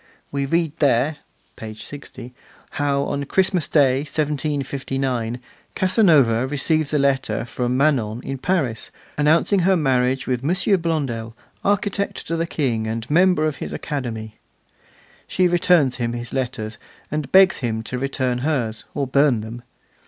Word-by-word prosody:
We 140 -1 -1
read 165 0 +1
there 145 +1 +2 0.4
(page 110 -1 -8
60) 130 -3 -9 0.4
how 145 -3 0
on 140 0 -2
Christmas 185 0 +1
Day, 135 -4 +3
1759, 135 -5 -2 0.4
Casanova 155 - +4
receives 150 +2 +1
a 150 - +2
letter 135 -5 0
from 125 +1 -2
Manon 125 -6 +1
in 135 -1 -5
Paris, 135 -10 -1 0.3
announcing 160 +6 +3
her 185 +1 +3
marriage 130 -3 +1
with 125 -1 -2
'M. 180 +5 +2
Blondel, 130 -9 -2 0.3
architect 200 0 0
to 165 - -2
the 165 0 -1
King, 120 -9 -1
and 115 +1 -4
member 180 -1 +4
of 155 -2 -1
his - - -6
Academy'; 110 -6 -5 0.9
she 185 -1 +2
returns 175 -6 +3
him 120 -2 -2
his 120 0 -6
letters, 120 -4 -3 0.3
and 150 -2 -3
begs 190 0 +6
him 110 -3 -2
to 125 +2 -5
return 130 -2 -1
hers, 125 -6 -2
or 140 - 0
burn 135 -3 +3
them. 115 +3 -8
140 Hz, 140 wpm, -22 LUFS, 120-155 Hz, 0.9 s, begs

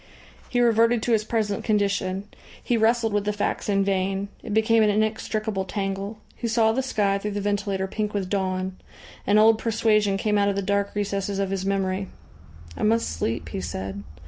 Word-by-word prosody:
He 245 - 0
reverted 230 -1 +3
to 240 - 0
his 220 -2 +3
present 215 -2 -1
condition. 200 -2 0 0.4
He 240 - +1
wrestled 225 0 +2
with 205 -1 +1
the 210 - 0
facts 210 0 -2
in 195 -1 +3
vain. 195 0 -1
It 220 - -7
became 220 +1 +3
an 215 - +4
inextricable 215 -1 -1
tangle. 195 +2 -3 0.2
He 235 - -3
saw 225 -1 +3
the 255 +4 0
sky 205 -6 0
through 210 +1 -4
the - - 0
ventilator 200 -1 -1
pink 210 +2 -3
with 200 -3 -2
dawn. 185 -1 -2 0.5
An 205 - +4
old 220 +1 +6
persuasion 215 -3 +2
came 210 +1 +1
out 200 0 +3
of 200 - -1
the 200 - -1
dark 200 +1 0
recesses 200 -1 -2
of 195 -1 -1
his 195 0 -2
memory. 195 -1 -1 0.7
"I - - -8
must 225 +2 +2
sleep," 110 +8 -3
he - - -4
said. 95 +2 -5
205 Hz, 190 wpm, -25 LUFS, 195-220 Hz, 0.7 s, old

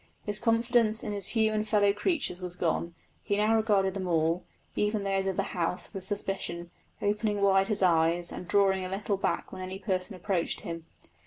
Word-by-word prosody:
His 205 0 -3
confidence 230 -1 +2
in 210 - -3
his 200 -2 0
human 215 -2 +2
fellow 205 -2 +3
creatures 210 - -1
was 180 -1 -4
gone; 170 -1 -1 0.3
he 200 - -1
now 215 +2 +3
regarded 205 -4 +2
them 190 -1 -3
all 165 +1 +1 0.3
even 210 0 0
those 195 -1 0
of 190 - -1
the - - +2
house 180 +3 -2
with 195 -2 -5
suspicion, 190 -3 -3 0.3
opening 210 0 0
wide 195 -1 +4
his 205 -2 +1
eyes 170 0 +3
and 180 - -7
drawing 195 -1 +3
a 185 - -4
little 200 +2 -1
back - - -2
when - - -7
any 185 +1 -5
person 190 0 -2
approached 180 -1 -1
him. 165 -1 -6
195 Hz, 185 wpm, -29 LUFS, 180-210 Hz, 0.3 s, wide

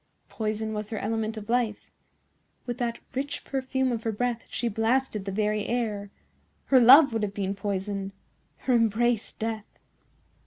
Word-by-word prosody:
Poison 220 0 -2
was 210 0 -3
her 220 - -4
element 220 +1 -2
of 210 -1 -7
life. 235 -3 -1 0.7
With 245 0 -4
that 235 -1 -1 0.2
rich 275 +2 -3
perfume 265 -1 -1
of 230 -2 -2
her 225 - -1
breath 235 +2 -2
she 240 - -2
blasted 225 -1 0
the 195 - -3
very 210 +1 0
air. 215 -4 -2 0.6
Her 265 - +5
love 265 +2 +8
would 225 - 0
have 200 -1 -2
been 195 -1 -1
poison—her 195 +4 -4
embrace 230 0 +2
death. 220 -1 -5
225 Hz, 150 wpm, -27 LUFS, 210-245 Hz, 0.7 s, love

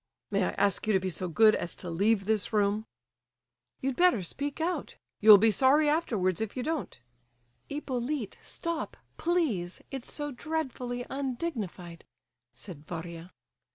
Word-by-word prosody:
"May 200 -2 +2
I - - +1
ask 200 +1 +1
you 215 - +3
to 190 - +4
be 185 0 -2
so 180 +3 -2
good 215 +6 +6
as 175 - -2
to - - -8
leave 195 +4 +2
this 215 -2 0
room?" 210 0 +1 0.9
"You'd 270 0 -1
better 350 - +4
speak 285 - -4
out. 345 +3 -2 0.2
You'll 215 -1 +10
be 220 +2 +5
sorry 280 +6 +4
afterwards 220 - +1
if 220 +2 -3
you 250 - -1
don't." 315 -1 -3 0.7
"Hippolyte, 265 -4 -3
stop, 335 -2 -4 0.2
please! 290 - 0
It's 270 -3 -5
so 290 -1 -3
dreadfully 250 -4 -3
undignified," 240 - -4 0.5
said 170 -7 -8
Varia. 170 +1 -7
225 Hz, 145 wpm, -29 LUFS, 190-285 Hz, 0.9 s, You'll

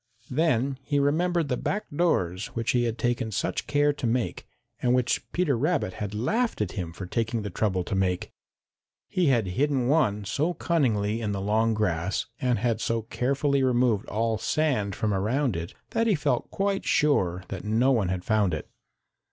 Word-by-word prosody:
Then 135 -2 +1
he 145 +2 -1
remembered 165 +3 +2
the 125 -2 -1
back 210 - -2
doors 95 - +1
which 115 0 0
he 120 -1 +2
had 115 0 -2
taken 120 -2 -1
such - - -2
care 145 0 +3
to 145 -4 -3
make, 120 +1 -1 0.3
and 125 0 +3
which 125 -2 0
Peter 170 -6 +1
Rabbit 145 - 0
had 105 0 -3
laughed 225 - 0
at 105 -5 -1
him 90 -4 -4
for 90 +3 -7
taking 115 +3 -1
the 105 - -4
trouble 95 -1 0
to 100 - -5
make. 95 -2 0 0.8
He 180 -3 +1
had 120 -6 +3
hidden 130 +7 0
one 105 -9 +2
so 155 - 0
cunningly 115 - +1
in 105 -2 -1
the 100 - -2
long 110 +3 +1
grass 95 -3 0
and 125 -2 +1
had 115 +1 0
so 115 -1 0
carefully 140 +4 0
removed 125 -5 +2
all 110 0 0
sand 125 -12 0
from 105 -2 0
around 115 - 0
it 85 +1 -5 0.2
that 230 0 +1
he 210 - +4
felt 140 -5 0
quite 195 0 -1
sure 95 -12 +2
that - - -5
no 115 +5 +2
one 110 -8 +2
had 90 -1 -3
found 105 -4 +2
it. - - -6
120 Hz, 185 wpm, -26 LUFS, 105-145 Hz, 0.8 s, he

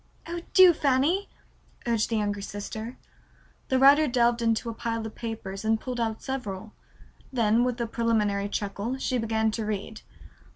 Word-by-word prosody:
"Oh, 340 +1 -5
do, 370 -2 +9
Fanny," 295 +7 +1 0.6
urged 230 -2 +1
the 225 - 0
younger 205 -1 -1
sister. 220 +4 -6 0.7
The 260 - +3
writer 285 +3 +6
delved 240 -2 +2
into 230 -1 +1
the 230 - -3
pile 230 0 -3
of 220 - -6
papers 220 -4 -6
and 220 0 +2
pulled 250 0 -5
out 225 -2 -2
several. 220 -6 -5 0.6
Then, 230 -2 +3
with 250 -1 -1
a 235 - 0
preliminary 215 -3 0
chuckle, 205 +5 -3
she 255 -1 -1
began 220 -1 +1
to 220 +1 -3
read. 215 +1 -4
230 Hz, 160 wpm, -27 LUFS, 215-255 Hz, 0.7 s, do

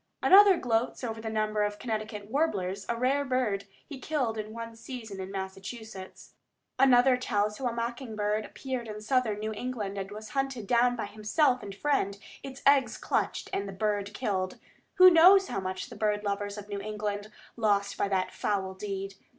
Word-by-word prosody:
Another 395 -1 +8
gloats 235 0 -1
over 225 -2 -4
the 220 - -4
number 215 -1 0
of 205 0 -1
Connecticut 215 -2 -4
warblers 200 - -1
a 235 - +1
rare 265 +4 +2
bird 250 -7 0 0.2
he 285 -4 -9
killed 260 -7 -1
in 215 0 -5
one 230 0 -7
season 225 -4 -8
in 190 0 -5
Massachusetts. 195 +1 -8 0.5
Another 255 -1 +6
tells 210 -4 -1
how 260 - -1
a - - 0
mocking 235 0 -4
bird 210 +1 0
appeared 255 0 -5
in 210 -1 -6
southern 225 -1 +1
New 215 +1 -3
England 210 -4 -4
and 195 0 -5
was 215 +1 -8
hunted 270 -5 -2
down 245 +3 +3
by 230 - -3
himself 245 +6 +1
and 200 -1 -8
friend, 200 -5 0 0.2
its 270 0 -9
eggs 275 -2 +4
"clutched," - - -1
and 200 - -1
the - - -7
bird 205 0 -1
killed. 190 -6 -2 0.4
Who 370 -1 +9
knows 370 +4 +7
how - - -2
much 185 0 -4
the - - -8
bird 210 -1 0
lovers 205 0 -2
of 205 0 -8
New 200 -1 -4
England 210 0 -4 0.2
lost 205 -3 +1
by - - 0
that 190 -2 0
foul 190 -2 -1
deed? 195 0 -5
215 Hz, 185 wpm, -29 LUFS, 205-250 Hz, 0.5 s, Who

